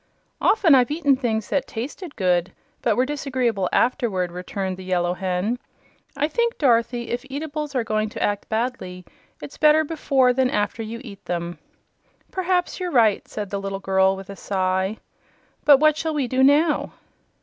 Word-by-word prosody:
"Often 380 -8 +4
I've 250 -3 +5
eaten 290 -2 +2
things 225 -5 -2
that 280 -2 0
tasted 285 - -6
good 180 -2 +1 0.3
but 225 -4 +1
were 255 - +3
disagreeable 255 -9 -1
afterward," 220 -9 +1
returned 185 +1 -4
the 190 - -9
Yellow 180 -1 0
Hen. 190 +6 -2 0.6
"I 295 - +2
think, 470 +7 0
Dorothy, 235 -3 +1
if 240 +1 -2
eatables 295 0 -5
are 250 - +1
going 215 -1 -1
to - - -4
act 205 -1 -1
badly, 220 -6 -3 0.4
it's 150 - -10
better 305 +1 +5
before 275 -5 +2
than 260 0 +2
after 210 -2 -1
you 225 +2 -6
eat 200 -6 -11
them." 170 -2 -4 0.7
"P'raps 365 -1 -1
you're 365 -1 -2
right," 225 - +3
said 205 -2 -6
the 200 -1 -2
little 195 0 -4
girl, 190 0 +2
with 195 0 -9
a - - -8
sigh. 190 +1 -1 0.7
"But 285 -2 +8
what 310 0 +4
shall 320 -1 -2
we 280 -4 0
do 260 +2 0
now?" 295 +4 +3
235 Hz, 170 wpm, -23 LUFS, 195-285 Hz, 0.7 s, But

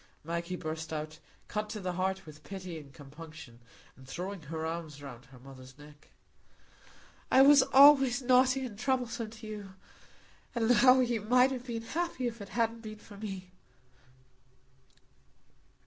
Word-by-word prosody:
Maggie 170 +3 -3
burst 160 -1 -5
out, 155 0 -5 0.3
cut 210 0 -3
to 215 - -5
the 185 -2 -3
heart 190 +1 -2
with 155 -1 -13
pity 185 -4 -7
and 140 -2 -14
compunction, 150 -3 -12 0.4
and 130 0 -16
throwing 185 +6 -5
her 160 +1 -5
arms 160 -3 -5
round 135 -4 -10
her 130 +1 -16
mother's 130 0 -13
neck; 150 0 -16 1.2
"I 265 - +7
was 285 0 +8
always 270 -1 +6
naughty 255 +1 +3
and 210 -4 -9
troublesome 245 -3 -1
to 220 0 -12
you. 205 -3 -8 0.8
And 230 -1 +1
now 255 +2 +6
you 240 -3 0
might 250 +5 +4
have 255 -1 -5
been 230 -2 -4
happy 325 0 -3
if 235 -2 -4
it 200 - -8
hadn't 230 0 -1
been 215 -1 -8
for 210 0 -14
me." 195 -3 -7
200 Hz, 150 wpm, -31 LUFS, 160-245 Hz, 1.2 s, was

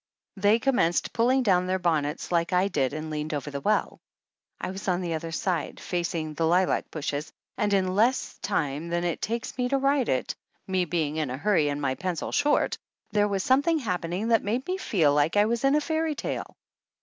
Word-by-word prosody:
They 205 +2 +4
commenced 235 -9 +1
pulling 255 +3 +3
down 180 -4 +3
their 185 +1 +1
bonnets 160 -4 -1
like 170 0 +1
I 185 +2 +3
did 140 -8 0
and 155 0 -5
leaned 150 +1 -3
over 145 0 -4
the 140 0 -4
well. 215 +6 0 0.6
I - - -3
was 190 +1 -7
on 180 -1 +1
the 170 -2 -2
other 165 +1 -4
side, 180 0 -2
facing 170 -3 -2
the 160 +2 0
lilac 180 +2 +2
bushes 150 -1 -4 0.2
and 210 -1 0
in 185 -2 +2
less 230 +6 +1
time 160 -6 -2
than 175 0 -1
it 175 -2 -2
takes 230 +1 -3
me 250 0 +1
to 275 - +2
write 275 -1 +2
it, 130 - 0 0.3
me 185 -2 0
being 160 -3 -1
in 155 -4 -1
a 130 - -4
hurry 160 -3 +2
and 145 0 -2
my 130 - +1
pencil 175 +2 -3
short, 290 +1 +2 0.3
there 205 -1 +3
was 195 -2 -1
something 285 +6 +3
happening 185 - -2
that 225 -1 +4
made 235 +6 -1
me 370 +1 -2
feel 165 - +2
like 150 +6 +2
I 205 - +6
was 235 +2 -1
in 275 +1 +4
a 300 - +3
fairy 315 0 -1
tale. - - -5
185 Hz, 210 wpm, -27 LUFS, 160-225 Hz, 0.6 s, I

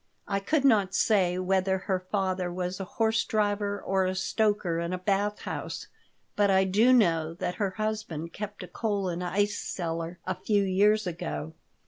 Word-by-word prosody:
"I 195 - 0
could 280 +8 +1
not 205 -7 +4
say 185 -5 +3
whether 190 +1 +1
her 185 0 -1
father 185 -1 -1
was 180 +1 -3
a - - -2
horse 225 +3 +1
driver 205 -1 0
or 190 -1 0
a 185 - -1
stoker 190 -3 0
in 170 +1 -2
a - - -1
bath 200 +2 0
house, - - -5 0.5
but 205 -1 +3
I 190 0 +5
do 210 +6 +4
know 165 -9 +3
that 180 +1 -3
her 190 -2 0
husband 215 -7 -3
kept 210 0 -6
a - - -8
coal 205 -4 -1
and 175 +1 -3
ice 205 +3 0
cellar 165 0 -4
a 185 - 0
few 205 +1 +1
years 205 +3 +3
ago." 80 - -4
190 Hz, 175 wpm, -28 LUFS, 180-210 Hz, 0.5 s, I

